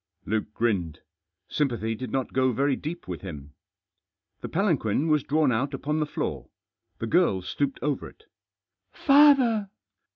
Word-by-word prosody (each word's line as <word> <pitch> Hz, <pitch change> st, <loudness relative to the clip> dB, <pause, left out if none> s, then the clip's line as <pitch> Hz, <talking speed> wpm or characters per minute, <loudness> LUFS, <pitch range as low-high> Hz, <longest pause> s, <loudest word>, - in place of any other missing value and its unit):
Luke 105 Hz, 0 st, -2 dB
grinned. 90 Hz, -9 st, -1 dB, 0.5 s
Sympathy 120 Hz, -7 st, -1 dB
did 125 Hz, +3 st, -6 dB
not 130 Hz, -2 st, -2 dB
go 130 Hz, 0 st, +2 dB
very 140 Hz, +3 st, +1 dB
deep 165 Hz, +6 st, -6 dB
with 90 Hz, -3 st, -5 dB
him. 75 Hz, -6 st, -9 dB, 0.9 s
The -, -, -5 dB
palanquin 160 Hz, -, +1 dB
was 150 Hz, -1 st, +3 dB
drawn 150 Hz, -2 st, +2 dB
out 135 Hz, +5 st, -1 dB
upon 150 Hz, +3 st, -2 dB
the 150 Hz, -, 0 dB
floor. -, -, -4 dB, 0.5 s
The -, -, -4 dB
girl 115 Hz, -, +2 dB
stooped 140 Hz, +8 st, -2 dB
over 145 Hz, -1 st, -2 dB
it. 440 Hz, -, -22 dB, 0.7 s
"Father!" 275 Hz, -8 st, +5 dB
135 Hz, 140 wpm, -26 LUFS, 110-155 Hz, 0.9 s, Father